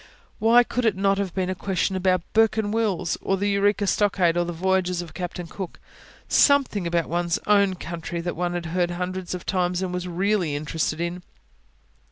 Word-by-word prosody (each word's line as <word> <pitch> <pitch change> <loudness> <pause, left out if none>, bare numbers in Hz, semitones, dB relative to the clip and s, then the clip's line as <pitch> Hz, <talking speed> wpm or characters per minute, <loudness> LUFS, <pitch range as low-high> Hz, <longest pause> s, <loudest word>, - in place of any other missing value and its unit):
Why 235 +2 +6
could 250 +1 -2
it 220 -4 +2
not 195 +1 +1
have 195 -3 -3
been 185 -1 0
a - - 0
question 190 +1 -1
about 185 -2 +1
Bourke 225 0 +4
and 210 -1 -1
Wills, 190 -6 0
or 195 - 0
the 205 +2 0
Eureka 205 +1 +2
Stockade, 190 -4 +2
or 175 0 +1
the 175 - -3
voyages 180 0 0
of 165 - -12
Captain 180 -1 -5
Cook?... 180 +2 -7 0.5
something 270 - +3
about 170 -1 0
one's 170 0 0
own 200 -2 +3
country, 170 0 -5
that 175 +1 -3
one 175 +1 -1
had 175 -1 -3
heard 175 -1 +1
hundreds 180 +1 -4
of 180 - -8
times 180 -1 0
and 180 -1 -3
was 180 0 -3
really 180 -3 0
interested 155 +1 -2
in. 170 +1 -3
185 Hz, 195 wpm, -24 LUFS, 175-200 Hz, 0.5 s, Why